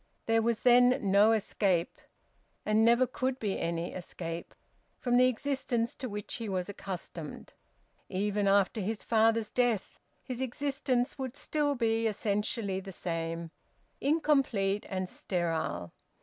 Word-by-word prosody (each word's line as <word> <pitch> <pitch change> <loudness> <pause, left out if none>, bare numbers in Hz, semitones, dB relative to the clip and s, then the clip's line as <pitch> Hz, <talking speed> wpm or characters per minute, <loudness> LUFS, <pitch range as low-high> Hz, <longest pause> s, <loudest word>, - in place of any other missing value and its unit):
There 225 0 +3
was 230 0 0
then 245 0 +6
no 205 +3 +6
escape, 195 -5 +1 0.7
and 215 +1 +3
never 235 +2 +5
could 255 +1 -2
be 205 -6 -2
any 170 0 -2
escape, 170 -2 -6 0.4
from 245 -1 0
the 250 +1 +6
existence 255 -2 -1
to 255 - -4
which 205 0 -4
he 225 -3 -4
was 185 -2 -1
accustomed; 180 -5 -7 0.6
even 205 +1 0
after 200 +2 +3
his 210 +2 -3
father's 225 -1 +2
death, 245 -5 0 0.2
his 255 -1 -5
existence 270 0 -1
would 260 0 -4
still 295 -2 0
be 225 -2 +1
essentially 205 -1 -1
the 195 0 -8
same 165 -1 -3 0.5
incomplete 270 -10 +2
and 185 -1 -2
sterile. 160 - -2
220 Hz, 130 wpm, -30 LUFS, 190-250 Hz, 0.7 s, then